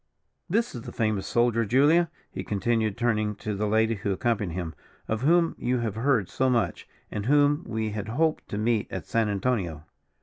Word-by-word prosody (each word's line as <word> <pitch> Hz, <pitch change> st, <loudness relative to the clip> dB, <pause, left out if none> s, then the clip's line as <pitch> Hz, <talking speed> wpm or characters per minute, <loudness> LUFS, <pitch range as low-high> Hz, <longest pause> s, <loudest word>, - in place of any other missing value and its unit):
This 225 Hz, +6 st, +1 dB
is 120 Hz, -, -6 dB
the -, -, -8 dB
famous 110 Hz, -3 st, -1 dB
soldier, 120 Hz, -1 st, +2 dB
Julia," 145 Hz, +9 st, +4 dB, 0.2 s
he -, -, -5 dB
continued 110 Hz, +1 st, 0 dB
turning 110 Hz, -3 st, 0 dB
to 105 Hz, +1 st, -4 dB
the 105 Hz, +1 st, -1 dB
lady 110 Hz, +2 st, +2 dB
who 100 Hz, -1 st, -2 dB
accompanied 100 Hz, -3 st, -1 dB
him, 85 Hz, -3 st, -4 dB, 0.3 s
"of 110 Hz, 0 st, -1 dB
whom 165 Hz, +4 st, +3 dB
you 125 Hz, +1 st, 0 dB
have 115 Hz, -4 st, -2 dB
heard 115 Hz, -3 st, +1 dB
so 130 Hz, +7 st, 0 dB
much, 115 Hz, -9 st, 0 dB, 0.2 s
and 105 Hz, +1 st, -3 dB
whom 145 Hz, +3 st, +4 dB
we 110 Hz, -1 st, -2 dB
had 105 Hz, 0 st, -4 dB
hoped 155 Hz, +8 st, 0 dB
to 100 Hz, -, -3 dB
meet 110 Hz, 0 st, 0 dB
at 95 Hz, -5 st, -5 dB
San 115 Hz, +2 st, +1 dB
Antonio." 95 Hz, -7 st, -1 dB
110 Hz, 190 wpm, -26 LUFS, 105-125 Hz, 0.3 s, Julia